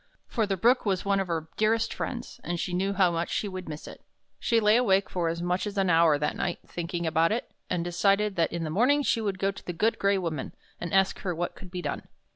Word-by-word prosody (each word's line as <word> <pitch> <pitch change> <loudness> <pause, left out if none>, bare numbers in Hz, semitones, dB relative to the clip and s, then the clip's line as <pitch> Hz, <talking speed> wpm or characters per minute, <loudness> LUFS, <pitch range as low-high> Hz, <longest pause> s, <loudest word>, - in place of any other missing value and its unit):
For 225 -4 -1
the 195 -1 -1
Brook 240 +7 +4
was 195 -4 0
one 200 0 +2
of 195 - -1
her 165 -2 -2
dearest 225 +1 +2
friends, 240 -2 -5
and 175 0 -3
she 180 - -2
knew 195 +2 0
how 190 -3 +3
much 170 0 -2
she 210 - -1
would 185 -3 -6
miss 150 0 -7
it. - - -10 0.4
She 230 -2 +2
lay 210 0 +4
awake 200 -5 +3
for 175 -2 0
as 170 +1 -3
much 180 +3 0
as 205 0 -6
an 190 -2 +3
hour 165 -2 +5
that 150 +1 -1
night, - - -2
thinking 170 0 -4
about 160 +1 +2
it, 230 +3 -2 0.2
and 175 -2 0
decided 195 +4 +2
that 165 -2 +1
in 170 0 -3
the 155 - -3
morning 260 - +3
she 230 - +1
would 200 -3 -1
go 195 +1 +1
to 195 - -12
the 175 - -4
Good 215 +7 +1
Gray 200 0 +3
Woman, 165 -7 -4 0.2
and 175 - -4
ask 190 0 +3
her 180 -3 -2
what 175 +2 -2
could 190 - -11
be 180 0 -5
done. - - -4
190 Hz, 255 wpm, -27 LUFS, 170-205 Hz, 0.4 s, hour